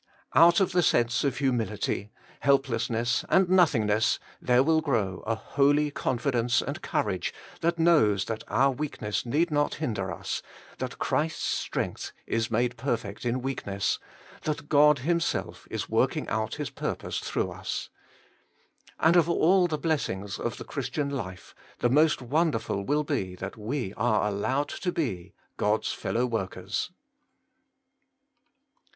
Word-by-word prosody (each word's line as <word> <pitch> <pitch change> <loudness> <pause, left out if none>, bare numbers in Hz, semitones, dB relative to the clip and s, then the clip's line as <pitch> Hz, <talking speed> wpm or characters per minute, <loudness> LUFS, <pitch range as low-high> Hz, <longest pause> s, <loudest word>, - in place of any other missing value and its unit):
Out 170 +1 +7
of 195 -1 +2
the 180 0 +3
sense 120 -7 +2
of 140 -2 0
humility, 115 -6 -1 0.3
helplessness, 120 -4 +1
and 190 -1 +4
nothingness 115 - +3 0.2
there 125 +1 +4
will 160 +2 +3
grow 110 -11 -1
a 115 - +1
holy 145 +5 +2
confidence 125 -3 +1
and - - -4
courage - - -1 0.3
that 170 +1 +1
knows 150 - +4
that 110 -1 -4
our 135 +2 +3
weakness 125 -6 -3
need 160 +7 +1
not 145 0 +1
hinder 105 - -2
us, - - -4 0.4
that - - -4
Christ's 155 +2 -1
strength - - -2
is 115 0 -1
made 120 +2 0
perfect 115 -4 -3
in 120 +1 -1
weakness, 100 -7 -1 0.4
that 150 -1 -3
God 150 0 +6
Himself 170 0 -1
is - - -3
working - - +1
out 110 -1 -1
His 145 -3 -4
purpose - - -3
through - - -2
us. - - -5 1.1
And 165 +2 +4
of 170 -1 +5
all 180 +2 +4
the 155 -3 -2
blessings 105 - -2
of - - -3
the - - -7
Christian 145 -2 -3
life, 95 -10 -6 0.2
the 120 - +1
most 150 +1 +3
wonderful 125 -7 0
will 150 +7 +1
be 95 -9 -2
that 95 +2 -6
we 115 -1 -3
are 110 -2 +2
allowed 130 +8 -1
to 180 - -2
be 110 - -3
— - - -36
God's 105 +1 +1
fellow 120 +2 -1
workers 100 -4 -3
130 Hz, 140 wpm, -27 LUFS, 110-150 Hz, 1.1 s, Out